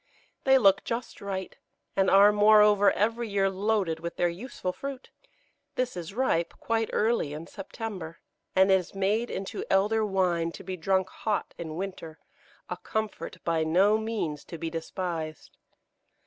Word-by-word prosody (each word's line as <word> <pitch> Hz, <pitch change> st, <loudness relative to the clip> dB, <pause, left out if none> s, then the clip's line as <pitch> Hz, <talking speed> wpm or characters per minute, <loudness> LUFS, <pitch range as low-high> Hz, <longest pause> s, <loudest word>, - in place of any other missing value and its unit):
They 265 Hz, 0 st, +6 dB
look 195 Hz, -5 st, +4 dB
just 235 Hz, +1 st, -5 dB
right, 195 Hz, -2 st, -4 dB, 0.4 s
and 195 Hz, -1 st, +3 dB
are, 200 Hz, +2 st, +7 dB
moreover, 210 Hz, -1 st, +6 dB
every 225 Hz, +2 st, 0 dB
year 195 Hz, -1 st, +1 dB
loaded 195 Hz, -4 st, 0 dB
with 170 Hz, +1 st, -5 dB
their 175 Hz, -, +2 dB
useful 185 Hz, 0 st, -5 dB
fruit. 275 Hz, +2 st, -7 dB, 0.6 s
This 250 Hz, -3 st, -1 dB
is 175 Hz, +2 st, -7 dB
ripe 225 Hz, -10 st, 0 dB
quite 225 Hz, -1 st, 0 dB
early 215 Hz, -10 st, +1 dB
in 155 Hz, +2 st, -6 dB
September, 195 Hz, -3 st, -7 dB, 0.4 s
and 190 Hz, +1 st, +5 dB
is 190 Hz, 0 st, +1 dB
made 210 Hz, +5 st, +1 dB
into 195 Hz, 0 st, -4 dB
Elder 210 Hz, +3 st, +3 dB
wine, 180 Hz, -5 st, +1 dB
to -, -, -10 dB
be 185 Hz, -, -4 dB
drunk 190 Hz, +2 st, +1 dB
hot 215 Hz, -2 st, -2 dB
in 160 Hz, -2 st, -5 dB
winter, 175 Hz, -3 st, -6 dB, 0.5 s
a -, -, -4 dB
comfort 220 Hz, -3 st, -4 dB
by 165 Hz, -1 st, +1 dB
no 190 Hz, +7 st, +4 dB
means 210 Hz, -10 st, -3 dB
to 170 Hz, -, -8 dB
be 165 Hz, 0 st, -4 dB
despised. 165 Hz, -1 st, -5 dB
195 Hz, 150 wpm, -28 LUFS, 170-215 Hz, 0.6 s, are